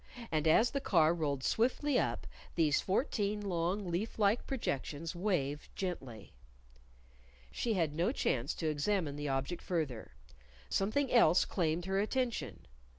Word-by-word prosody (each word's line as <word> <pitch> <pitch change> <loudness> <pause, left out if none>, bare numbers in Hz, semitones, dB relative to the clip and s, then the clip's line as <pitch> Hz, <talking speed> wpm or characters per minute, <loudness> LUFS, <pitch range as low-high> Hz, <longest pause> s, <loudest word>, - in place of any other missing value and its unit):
And 155 -1 +1
as 225 +9 +5
the 275 - -2
car 165 - +4
rolled 145 -5 -2
swiftly 260 +4 +2
up, - - -1 0.3
these 155 -4 +3
fourteen 210 -1 0
long 185 0 -1
leaf 195 +7 -2
like 210 +2 +2
projections 160 - -3
waved 150 -7 -1
gently. 135 - -5 1.2
She 225 - -1
had 165 -5 +1
no 170 +8 +1
chance 135 - -1
to 160 - -2
examine 155 0 0
the 145 0 -3
object 135 +6 -2
further. 150 -10 -3 0.6
Something 235 +8 0
else 180 -8 +6
claimed 170 -1 -1
her 190 +1 0
attention. 240 +3 -2
175 Hz, 135 wpm, -33 LUFS, 150-210 Hz, 1.2 s, else